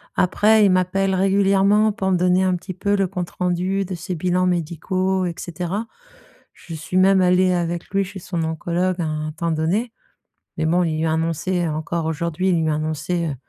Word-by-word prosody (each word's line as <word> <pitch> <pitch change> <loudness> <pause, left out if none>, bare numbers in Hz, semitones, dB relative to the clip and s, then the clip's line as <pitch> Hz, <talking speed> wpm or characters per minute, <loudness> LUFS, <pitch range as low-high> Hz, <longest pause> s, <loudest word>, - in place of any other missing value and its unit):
Après 210 +4 +4
il 195 - +4
m'appelle 190 +1 +1
régulièrement 195 +2 +3
pour 190 -3 -2
me 180 - +3
donner 180 +1 +3
un 185 -1 +2
petit 180 +2 -7
peu 200 +3 0
le 195 -1 +1
compte 180 -2 -4
rendu 180 +2 -1
de 185 - -5
ses 180 +2 -5
bilans 180 +2 0
médicaux 180 +2 -1
et 175 - -2
cetera. 180 +6 -4 0.7
Je 170 - -11
suis 160 +4 -3
même 190 0 +5
allée 180 0 +3
avec 175 0 -2
lui 195 0 +1
chez 195 +1 -8
son 170 -2 -3
oncologue 175 +3 -1
à 165 - -1
un 155 0 -3
temps 165 +2 -3
donné 180 +10 0 0.7
mais 160 - 0
bon, 175 +3 +2
il 160 -2 -1
lui 165 - 0
a 160 - +1
annoncé 165 +2 -1
encore 160 +2 -3
aujourd'hui, 170 +3 -2
il 170 -3 +2
lui 160 - +1
a 155 - +1
annoncé, 155 +3 -2
heu, 140 - -4
180 Hz, 200 wpm, -21 LUFS, 165-190 Hz, 0.7 s, même